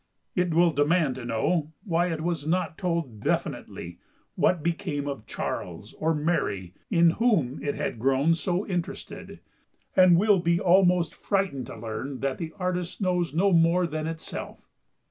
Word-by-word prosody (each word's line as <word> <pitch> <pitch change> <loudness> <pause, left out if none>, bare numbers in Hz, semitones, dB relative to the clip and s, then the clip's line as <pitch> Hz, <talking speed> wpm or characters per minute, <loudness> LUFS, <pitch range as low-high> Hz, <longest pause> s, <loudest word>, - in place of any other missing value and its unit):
It 180 -1 +1
will 170 +1 +4
demand 150 0 +2
to 125 - -7
know 150 +7 0
why 175 -4 +1
it 165 -3 -3
was 160 -3 -2
not 180 0 0
told 165 - -2
definitely 85 -3 -3 0.3
what 175 -5 +1
became 165 -4 -2
of 135 -7 -5
Charles 90 +5 -5
or 160 +1 0
Mary 145 - -1 0.2
in 170 -4 +5
whom 170 - +1
it 145 -1 -2
had - - -3
grown 135 +6 +3
so 175 +3 -1
interested; 175 -3 -5 0.5
and 185 -2 +7
will 205 0 +4
be 170 0 +2
almost 180 -1 +4
frightened 190 - -1
to - - -8
learn 125 +4 -5
that 135 -1 -1
the 165 -2 -4
artist 180 -2 -2
knows 180 -5 0
no 195 +4 +3
more 170 +2 +4
than 155 -1 -3
itself. 165 0 -7
165 Hz, 155 wpm, -26 LUFS, 145-180 Hz, 0.5 s, and